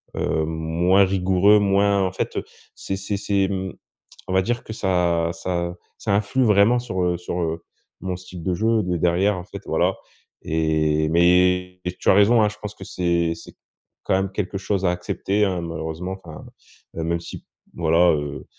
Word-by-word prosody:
heu, 80 0 0
moins 80 +4 +2
rigoureux, 95 +2 +4
moins 100 0 +2
en 95 - -1
fait, 95 - -3
heu, - - -1 0.3
c’est 95 - -4
c'est 100 +1 -3
c’est 100 -1 +1
mmh, 95 -2 -3 0.5
on 95 - -3
va 95 - +4
dire 120 +4 -2
que 110 - -7
ça 90 -5 +1
ça 85 0 -3 0.2
ça 100 - 0
influe 105 +6 +1
vraiment 105 +2 +4
sur, 100 -7 -3
heu, 90 -1 +1
sur, 90 +1 -4
heu, 80 0 -3 0.4
mon 95 -1 -3
style 90 -1 -10
de 90 - 0
jeu 110 +3 +2
de 90 -1 -1
derrière 90 +4 +2
en 90 - -6
fait, - - -9
voilà. - - +1 0.5
Et, 80 -1 +1
mais 90 +2 +3 0.2
tu - - +1
as - - +7
raison 110 +3 +5
hein, 105 - +3
je 105 - -11
pense 105 -1 -6
que 95 - -10
c’est 85 -2 0
c'est - - -13 0.5
quand - - +1
même 95 0 0
quelque 100 0 -3
chose 95 0 -1
à - - +4
accepter, 95 +3 -1
hein, 90 -3 -1
malheureusement, 80 +2 -5
enfin. 80 -3 -10 0.5
Heu, 80 - -2
même 85 +1 -1
si, - - -9 0.3
voilà, 85 +1 +3
heu 75 -1 -4
90 Hz, 185 wpm, -22 LUFS, 85-100 Hz, 0.5 s, as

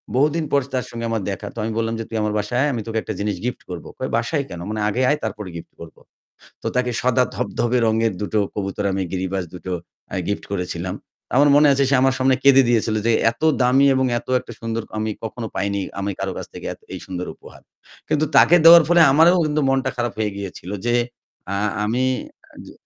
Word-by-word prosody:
বহুদিন 150 +4 +2
পর 140 - +3
তার 125 - -1
সঙ্গে 115 0 -5
আমার 115 -2 -1
দেখা। 95 - -6
তো - - -19
আমি 110 - -2
বললাম 115 0 0
যে, - - -2
"তুই 115 - -3
আমার 105 0 -1
বাসায় 105 +4 -2
আয়, 145 - +2
আমি 115 - -2
তোকে 115 0 -2
একটা - - -5
জিনিস 105 -1 -1
গিফট 125 0 -3
করব।" 90 -2 -7
কয়, 130 - -3
"বাসায় 140 +5 -1
কেন?" 85 - -7
"মানে 110 0 -3
আগে 105 +5 0
আয়, 150 - +2
তারপরে 105 -3 -4
গিফট 85 - -9
করব।" 85 -1 -11 0.7
তো - - -6
তাকে 125 0 +1
সাদা 125 0 +3
ধবধবে 120 +1 0
রঙের 110 0 +2
দুটো 105 +1 -1 0.2
কবুতর, 100 0 -3
আমি 95 0 -1
গিরিবাজ 95 0 -2
দুটো, 90 +1 -6 0.4
আ - - -3
গিফট 100 - -2
করেছিলাম। 90 0 -3 0.4
আমার 145 +3 +5
মনে 150 0 +6
আছে, 140 0 +2
সে 140 - +3
আমার 135 -1 +3
সামনে 130 0 +3
কেঁদে 135 -1 +7
দিয়েছিল 115 -2 +1
যে 115 - +4 0.2
এত 115 - -15 0.2
দামি 130 +3 +4
এবং 130 0 +2
এত - - -14
একটা - - -11
সুন্দর, 115 0 -3 0.2
আমি 110 0 -1
কখনো 115 +1 -5
পাইনি 100 0 -1 0.2
আমি 100 - -2
কারো - - -2
কাছ - - -6
থেকে - - -7 0.3
এই - - -5
সুন্দর 90 -1 -5
উপহার। - - -16 0.5
কিন্তু 155 0 +2
তাকে 175 - +7
দেওয়ার 170 0 +10
পরে 175 0 +5
আমারও 165 +5 +6
কিন্তু 150 0 0
মনটা 135 -1 +1
খারাপ 120 -1 -1
হয়ে 105 -1 0
গিয়েছিল 95 -2 -7 0.2
যে, 120 - +2 0.6
আ - - -1 0.3
আমি 120 +4 0 0.6
যে - - -11
115 Hz, 215 wpm, -21 LUFS, 105-130 Hz, 0.7 s, দেওয়ার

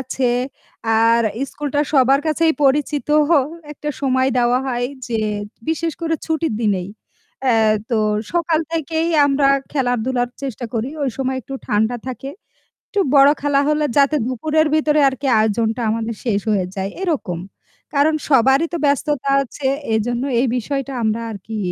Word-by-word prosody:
আছে 260 -1 -1 0.7
আর 230 +1 +4 0.3
স্কুলটা 290 0 -2
সবার 270 0 +4
কাছেই 320 +1 +2
পরিচিত 290 +2 +1 0.6
একটা 300 0 -6
সময় 260 -1 +2
দেওয়া 245 +1 +3
হয় 245 -1 -1 0.2
যে 225 -2 -1 0.5
বিশেষ 325 +1 -1
করে 325 -1 0
ছুটির 320 -5 -1
দিনেই 195 -5 0 0.6
এ - - +4 0.4
তো 230 - +2 0.3
সকাল 335 -2 +1
থেকেই 325 +1 -1 0.2
আমরা 275 0 +2 0.2
খেলাধুলার 245 -2 0
চেষ্টা 255 -3 -4
করি। 230 +3 -1
ওই 270 - 0
সময় 265 -1 -1
একটু 270 - -8
ঠান্ডা 220 +3 +1
থাকে 265 +2 -5 0.6
একটু 410 - -2 0.2
বড় 275 0 +8
খেলা 285 -1 +2
হলে 300 0 +2
যাতে 285 +2 +4
দুপুরের 310 +5 +1
ভিতরে 305 -1 +2
আরকি 270 +1 -5
আয়োজনটা 220 +2 0
আমাদের 225 0 -2
শেষ 210 -4 +1
হয়ে 195 -3 +1
যায় 195 0 -2
এরকম। 260 - -2 0.5
কারণ 290 +3 +3 0.2
সবারই 270 +3 +4
তো 340 - 0
ব্যস্ততা 285 -1 0
আছে 270 +2 -5 0.3
এইজন্য 240 +3 0 0.2
এই 255 - +2
বিষয়টা 275 +2 -3
আমরা 220 +1 0
আরকি 215 +2 -7
265 Hz, 145 wpm, -19 LUFS, 235-295 Hz, 0.7 s, বড়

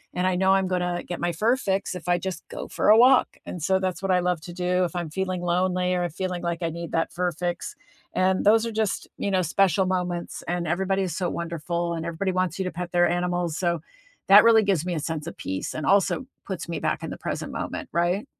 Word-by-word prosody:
and 180 +1 +1
I 185 - +1
know 190 +1 +3
I'm 190 -1 +2
gonna 180 -1 -1
get 175 - -5
my 175 0 0
fur 225 +10 +2
fix 195 -4 -1
if 180 0 -8
I 175 - +4
just 190 0 -5
go - - -6
for - - +1
a 215 - +8
walk. 255 +2 +5
And 175 - -6
so 190 +2 +2
that's 185 -1 -2
what 195 -1 0
I 180 - +4
love 180 -2 0
to 175 +1 -9
do 180 0 +1
if 175 - -6
I'm 170 -3 -3
feeling 185 +1 -2
lonely 180 +1 +1
or 175 0 0
feeling 180 +1 -4
like 170 0 -2
I 165 - 0
need 170 +1 -6
that 165 - 0
fur 180 0 -1
fix, 175 - -4 0.4
and 185 +1 +1
those 225 +2 +5
are 230 - -3
just, 220 -2 -1
you 200 - -2
know, 185 -1 +2
special 190 +2 +2
moments, 180 -2 -2
and 175 0 -1
everybody 190 +3 0
is 175 -4 -3
so 180 -2 0
wonderful, 170 +1 -3
and 165 0 -4
everybody 170 +3 -1
wants 185 -2 0
you 190 - +1
to 185 - -2
pet 175 0 -5
their 175 0 +4
animals. 175 -2 -1
So, 170 -3 0 0.5
that 200 +2 +9
really 225 -1 +6
gives 185 -5 +1
me 180 - -1
a 155 - -1
sense 160 0 -4
of - - -6
peace 95 0 -4
and 155 - -3
also 200 +6 +2 0.2
puts 185 -3 -5
me 170 - -2
back - - -1
in - - -4
the - - -6
present - - -4
moment, 305 -4 -5
right? 175 +7 +1
180 Hz, 250 wpm, -25 LUFS, 170-190 Hz, 0.5 s, that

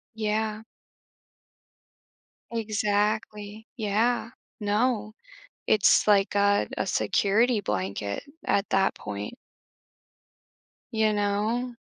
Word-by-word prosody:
Yeah. 215 0 -1 1.9
Exactly, 210 -1 -1
yeah. 225 +2 0 0.3
No, 215 +1 0 0.5
it's 215 0 +4
like 200 -1 +4
a 200 0 +3
a - - -1
security 220 +3 +2
blanket 100 - -3 0.2
at 200 +1 +1
that 195 0 +2
point. 100 0 -6 1.6
You 220 -1 +2
know? 210 +4 -1
210 Hz, 75 wpm, -26 LUFS, 200-220 Hz, 1.9 s, it's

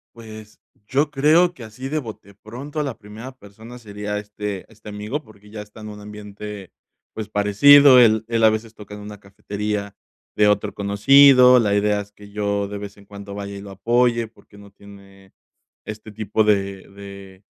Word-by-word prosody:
Pues, 110 -2 -12 0.3
yo 145 +3 0
creo 155 +5 +3
que 130 - -12
así 115 +4 -8
de 155 +2 -2
bote, 110 -5 -10
de - - -17
pronto 130 +9 -8
a - - 0
la 135 -5 -5
primera 110 +5 -10
persona 110 +4 -13
sería 105 -2 -6
este 105 -1 -6
este 110 -1 -13
amigo 105 +9 -5
porque 105 -2 -19
ya 105 -1 -7
está 105 +1 -14
en 105 - -8
un 105 0 -10
ambiente, 105 -1 -10 0.4
pues, 110 -2 -7
parecido, 130 +7 +6
él 110 -2 +4
él 115 -1 0
a 110 - +7
veces 110 +1 -4
toca 105 -1 -11
en 105 - -10
una 105 0 -10
cafetería 100 +1 -5 0.4
de 105 - +4
otro 105 -1 0
conocido, 125 +5 +6
la 105 -3 +1
idea 105 0 +1
es 100 0 -13
que 105 0 -16
yo 100 -1 -2
de 105 - -7
vez 100 0 -9
en 100 - -18
cuando 100 0 -10
vaya 100 0 -7
y 100 - -8
lo 100 - -10
apoye 120 +3 +1
porque 110 -1 -21
no 100 -1 -15
tiene 100 -1 -17 0.6
este 110 0 -9
tipo 110 0 -1
de 100 -2 -1
de 100 -1 -13
105 Hz, 190 wpm, -21 LUFS, 100-115 Hz, 0.6 s, a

